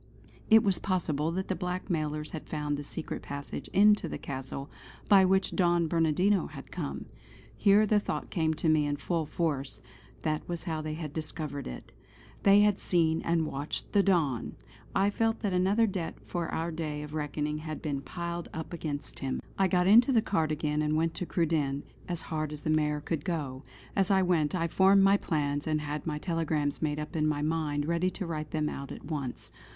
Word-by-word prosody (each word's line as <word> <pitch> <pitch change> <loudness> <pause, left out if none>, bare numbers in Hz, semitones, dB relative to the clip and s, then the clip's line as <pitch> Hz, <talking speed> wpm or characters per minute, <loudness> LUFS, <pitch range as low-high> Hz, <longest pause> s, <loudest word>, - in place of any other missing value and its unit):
It 220 0 +7
was 195 -3 +3
possible 160 -5 0
that 190 +1 -2
the - - 0
blackmailers 165 -4 -2
had 160 - -7
found 150 -1 -1
the 145 - -5
secret 150 - -5
passage 140 0 -6
into 205 -3 +4
the - - -4
Castle 135 0 -6 0.4
by 195 -2 +7
which 190 +1 +2
Don 175 -2 +3
Bernardino 170 +5 +2
had - - -11
come. - - -4 0.5
Here 205 +1 +5
the 210 0 +3
thought - - -4
came 160 -3 +1
to 160 - -2
me 155 -2 +4
in 145 - 0
full 160 +1 -2
force; 145 -6 -2 0.4
that 155 +1 -2
was 175 -1 -3
how 160 -3 -2
they 155 0 -4
had 155 -3 -6
discovered 155 -2 -3
it. 60 - -8 0.5
They 200 +1 +6
had 210 -1 +3
seen 165 -2 +2
and 165 -1 +1
watched 145 0 -4
the 205 - +6
Don!... 160 - +1 0.4
I 195 +1 +3
felt 225 +2 0
that 205 -4 0
another 195 +5 +3
debt 185 -6 -3
for 175 -2 -3
our 165 +1 -2
day 155 -2 -4
of 150 0 -9
reckoning 150 0 -2
had 155 0 -5
been 145 -3 -3
piled 170 +3 -5
up 160 +2 -5
against 150 -4 -4
him. 135 -1 -2 0.2
I 195 - +5
got 180 0 +2
in 210 +5 +9
the 245 -1 +3
cart 180 -8 0
again 150 0 0
and 155 0 +1
went 165 +1 +1
to 180 - -4
Cruden 150 -5 0 0.2
as 175 -2 -2
hard 155 -2 -3
as 150 -1 -7
the 155 - 0
mare 150 -1 +1
could 155 +1 -3
go. 145 -8 -3 0.3
As 195 0 +2
I 190 -1 +4
went, 170 -2 +2
I 170 -2 +1
formed 195 +3 +5
my 195 +1 +6
plans, 145 -5 -1
and 155 -1 +1
had 150 0 -4
my 150 -2 -1
telegrams 155 -3 -1
made 150 -2 0
up 150 +1 -5
in 155 -1 +2
my 150 -1 0
mind 150 -2 0
ready 170 +3 +1
to 185 - -5
write 155 -2 -4
them 155 -1 -1
out 140 -2 -5
at - - -8
once. 140 -6 -4
160 Hz, 200 wpm, -29 LUFS, 150-180 Hz, 0.5 s, in